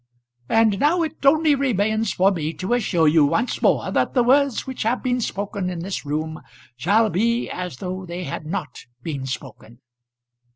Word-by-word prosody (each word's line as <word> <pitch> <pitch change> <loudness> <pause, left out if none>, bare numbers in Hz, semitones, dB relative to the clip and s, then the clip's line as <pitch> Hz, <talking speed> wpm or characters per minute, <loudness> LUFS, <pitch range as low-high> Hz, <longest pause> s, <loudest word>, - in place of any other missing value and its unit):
"And 220 -3 +3
now 335 +4 +3
it 320 -2 -6
only 310 +1 +5
remains 220 -5 +1
for 190 +2 +3
me 160 -4 -3
to 185 +9 -2
assure 185 -9 +2
you 155 0 +5
once 225 - 0
more - - +2
that - - 0
the 245 - +4
words 275 +1 +3
which 260 -1 -6
have 230 +3 0
been 250 -1 0
spoken 200 -3 -3
in 175 -2 -5
this 185 -4 -5
room 155 +2 -3 0.3
shall 205 - +2
be 235 +6 0
as 180 -7 -5
though 185 +2 -5
they 175 +1 -5
had 155 0 -6
not 155 -9 -5 0.2
been 140 -4 -4
spoken." 120 -2 -8
195 Hz, 175 wpm, -22 LUFS, 160-240 Hz, 0.3 s, only